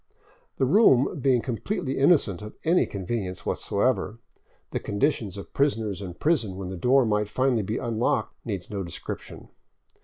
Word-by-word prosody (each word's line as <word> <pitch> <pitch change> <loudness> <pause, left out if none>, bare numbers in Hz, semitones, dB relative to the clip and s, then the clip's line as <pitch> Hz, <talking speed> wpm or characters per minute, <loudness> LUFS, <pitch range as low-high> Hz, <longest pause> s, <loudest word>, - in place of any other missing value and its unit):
The - - +2
room 140 - +4
being 125 -3 +3
completely 135 - -2
innocent 135 - +3
of 105 0 -9
any 170 +3 +3
convenience 95 -1 -4
whatever, 110 +1 0 0.5
the - - -1
conditions 105 - -1
of 100 - -9
prisoners 110 -9 0
and 90 -3 -7
prison 125 - +1
when 95 -1 -5
the 95 - -5
door 125 +8 +4
might 105 -1 +1
finally 130 -1 +1
be 105 +4 -2
unlocked 115 0 0
needs 100 -6 -4
no 100 -2 -4
description. 85 -3 -7
110 Hz, 150 wpm, -26 LUFS, 100-135 Hz, 0.5 s, room